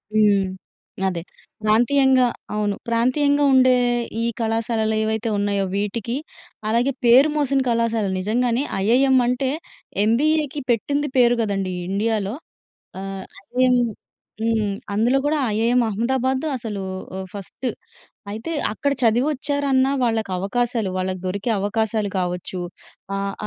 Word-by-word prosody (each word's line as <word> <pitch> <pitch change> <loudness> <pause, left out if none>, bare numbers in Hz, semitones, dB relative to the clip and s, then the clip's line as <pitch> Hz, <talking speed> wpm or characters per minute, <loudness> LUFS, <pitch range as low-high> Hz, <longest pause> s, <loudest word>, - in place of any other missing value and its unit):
హ్మ్. 205 -2 +4 0.6
అదే 175 -3 -2 0.4
ప్రాంతీయంగా 255 +4 +4 0.3
అవును. 210 -1 0
ప్రాంతీయంగా 285 +5 +2
ఉండే 255 -1 +6 0.5
ఈ - - 0 0.2
కళాశాలలు 225 -1 0
ఏవైతే 220 +1 -1
ఉన్నయో 200 -1 0
వీటికి, 210 +4 -2 0.5
అలాగే 235 +5 +2
పేరు 255 +6 +7
మోసిన 280 -2 +2
కళాశాలలు 230 -4 +1
నిజంగానే 240 +6 +1 0.2
ఐఐఎం 260 +3 +4
అంటే 250 +2 0 0.5
ఎంబీఏ‌కి 295 +5 +1
పెట్టింది 285 +5 +1
పేరు 240 -1 +5
గదండీ 195 -4 -1 0.2
ఇండియాలో. 205 0 0 0.7
ఆహ్, 195 0 -6 0.2
ఐఐఎం 255 0 +3 0.7
హ్మ్. 220 -2 +1 0.2
అందులో 235 +6 +3
గూడా 305 +1 +1 0.2
ఐఐఎం 235 +3 +3
అహ్మదాబాద్ 260 +5 0
అసలు 215 -4 -5 0.3
ఓహ్, 190 0 -5
ఫస్టు 200 +6 -5 0.6
అయితే 225 +10 -5 0.2
అక్కడ 280 +7 -1
చదివొచ్చారన్నా, 270 +2 +2
వాళ్ళకి 225 -4 0
అవకాశాలు 230 +1 -1
వాళ్ళకి 185 0 -2
దొరికే 200 +5 -2
అవకాశాలు 215 0 0
కావచ్చు, 180 0 -3 0.6
ఆహ్, 195 0 -2
230 Hz, 110 wpm, -22 LUFS, 205-255 Hz, 0.7 s, పేరు